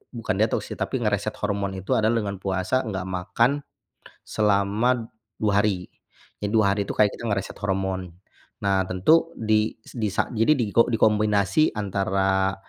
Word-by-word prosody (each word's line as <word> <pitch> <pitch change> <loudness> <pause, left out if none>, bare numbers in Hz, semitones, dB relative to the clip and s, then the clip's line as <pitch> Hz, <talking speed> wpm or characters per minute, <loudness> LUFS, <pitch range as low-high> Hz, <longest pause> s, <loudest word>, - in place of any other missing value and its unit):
bukan 115 -5 -2
detoks, 110 +1 +1
sih, - - -5
tapi - - -2
nge-reset - - -1
hormon 100 -1 -1
itu 95 - -7
adalah 110 +2 +2
dengan 100 -1 -3
puasa, 95 +7 -1
gak 95 -3 -4
makan 95 +7 +1 0.7
selama 110 +3 +1 0.3
2 100 -2 +3
hari. 95 -4 -1 0.5
Jadi 105 - -1
2 105 -3 +4
hari, 100 -1 -1
tuh, - - -1
kita 105 -1 +4
kayak - - -7
nge-reset 100 -1 -4
hormon. 95 -2 -2 0.5
Nah, 100 -1 +2
tentu 160 - +3
di 110 0 +1
s - - -14
di 110 -2 0
sa - - 0
jadi 115 +6 +4
diko 115 -1 +3
dikombinasi 105 +4 +2
antara 95 -1 0
100 Hz, 155 wpm, -24 LUFS, 95-110 Hz, 0.7 s, 2